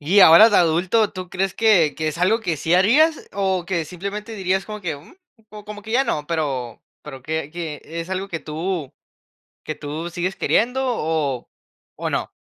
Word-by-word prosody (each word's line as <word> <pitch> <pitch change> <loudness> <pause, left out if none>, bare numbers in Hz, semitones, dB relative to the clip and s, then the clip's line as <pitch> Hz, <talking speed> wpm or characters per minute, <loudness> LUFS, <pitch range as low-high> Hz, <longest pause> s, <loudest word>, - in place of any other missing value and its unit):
Y 180 +8 +4
ahora 185 +6 +9
de 210 - +4
adulto, 180 +6 +2
¿tú 185 -1 -7
crees 190 +1 -1
que 190 -9 +4
que 155 -1 -1
es 155 - -5
algo 200 +6 +2
que 175 -7 -2
sí 160 +4 +1
harías, 285 - +3
o, 190 -2 0
que 175 -3 -1
simplemente 200 +6 -6
dirías 190 -1 -1
como 215 -1 -7
que: 165 -6 -3
"Mm, 145 - -16 0.5
como 210 0 -9
que 220 +1 -7
ya 265 +3 +3
no", 150 - -2
pero 135 -8 -3 0.2
pero 135 -3 -10
que 155 +1 -3
que 160 -3 -6
es 165 +3 -6
algo 190 +1 -3
que 165 -4 -4
tú 160 -1 -4 0.7
que 155 - -4
tú 155 +3 -5
sigues 175 +2 -3
queriendo, 250 +4 +1
o 155 - -1 0.5
o, - - -3
no? - - -2
175 Hz, 190 wpm, -21 LUFS, 155-200 Hz, 0.7 s, ahora